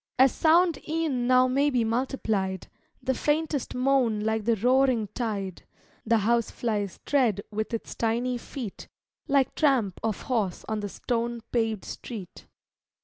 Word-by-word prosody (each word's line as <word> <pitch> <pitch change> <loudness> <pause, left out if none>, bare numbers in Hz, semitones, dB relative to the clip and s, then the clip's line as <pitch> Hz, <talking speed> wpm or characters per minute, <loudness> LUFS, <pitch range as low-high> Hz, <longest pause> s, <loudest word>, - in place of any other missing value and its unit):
As 265 0 +6
sound 335 0 +3
e'en 305 -7 0
now 255 0 +5
may 275 +3 +2
be 250 -4 +1
multiplied; 220 -6 -1 0.4
The 260 - +1
faintest 295 0 -1
moan 250 -4 +2
like 220 0 -1
the 230 0 +3
roaring 250 -1 +2
tide; 200 -7 -3 0.5
The 230 0 +4
housefly's 220 -2 0
tread 240 -8 +2
with 215 +1 -3
its 230 - -4
tiny 240 +2 0
feet 235 -5 -7 0.4
Like 275 -3 +2
tramp 255 - +2
of 220 -3 -2
horse 215 -8 -1
on 220 -1 -1
the 205 -1 -4
stone 235 +2 -2
paved 225 -4 0
street. 210 -8 -8
235 Hz, 140 wpm, -27 LUFS, 215-265 Hz, 0.5 s, As